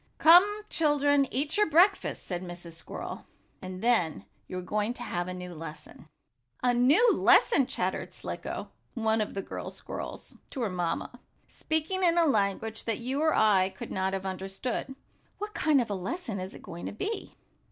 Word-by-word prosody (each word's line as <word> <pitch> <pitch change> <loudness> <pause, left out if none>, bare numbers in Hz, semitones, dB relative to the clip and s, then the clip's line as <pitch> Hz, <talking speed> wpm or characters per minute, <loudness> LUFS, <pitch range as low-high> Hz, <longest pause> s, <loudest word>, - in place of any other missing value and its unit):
"Come, 385 +6 +7
children, 290 -5 +3
eat 290 +6 0
your 420 -5 +3
breakfasts," 365 +6 +3
said 175 -2 -3
Mrs. 175 -1 -8
Squirrel, 165 - -7 0.3
"and 185 0 -7
then 225 -10 +2 0.2
you 185 - -5
are - - -3
going 210 +5 -1
to 245 - -7
have 175 -5 -3
a - - -4
new 180 -1 -7
lesson." 155 -1 -10 0.6
"A 245 -1 +4
new 295 - +5
lesson!" 280 - +5
chattered - - -2
Slicko, - - -6 0.2
one 220 -1 +1
of 210 - -3
the 195 - -3
girl - - -6
squirrels, - - -7 0.2
to 265 - -4
her 220 -5 -1
mamma, 180 +7 -3 0.3
speaking 320 +4 -2
in 345 -1 +4
a 340 - +5
language 220 -3 0
that 225 -3 -1
you 260 +4 -2
or 315 0 +3
I 195 -3 +4
could - - -7
not 190 0 -1
have 195 0 -3
understood. 195 +8 -4 0.4
"What 420 +1 -5
kind 305 -6 +3
of 235 -4 -1
a - - +1
lesson 210 - -4
is 185 +2 -6
it - - -12
going 175 -3 -7
to - - -5
be?" 400 - -4
225 Hz, 180 wpm, -29 LUFS, 190-305 Hz, 0.6 s, Come